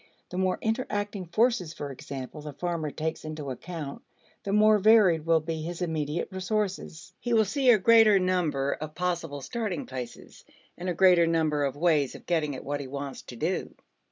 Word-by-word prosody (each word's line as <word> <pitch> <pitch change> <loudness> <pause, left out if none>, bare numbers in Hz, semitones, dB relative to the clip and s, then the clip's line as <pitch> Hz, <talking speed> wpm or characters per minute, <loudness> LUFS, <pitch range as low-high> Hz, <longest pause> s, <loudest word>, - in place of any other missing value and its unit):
The 180 - -5
more 185 -1 +1
interacting 205 -4 -2
forces, 215 -3 +1
for 145 -1 -5
example, 135 +2 -7
the 150 -1 -7
farmer 170 -1 -2
takes 160 +2 -4
into 155 -3 -5
account, 145 +2 -6 0.4
the 200 - -3
more 210 +1 +5
varied 190 -7 +5
will 165 -1 +4
be 160 0 -4
his 170 +2 -5
immediate 160 -2 -2
resources. 190 -3 -3
He 240 - -2
will 220 -1 +5
see 265 +5 +1
a 235 - +8
greater 220 0 +6
number 175 -7 +1
of 155 0 -5
possible 170 -5 -2
starting 210 - -3
places, 125 -2 -8 0.3
and 180 +1 -4
a 175 - -1
greater 180 -2 +5
number 155 -3 +1
of 140 -1 -1
ways 150 -4 +2
of - - -12
getting 155 -5 0
at - - -8
what 145 +1 -2
he 140 - -6
wants 140 0 -6
to 125 - -11
do. 160 +10 -2
170 Hz, 185 wpm, -27 LUFS, 150-195 Hz, 0.4 s, a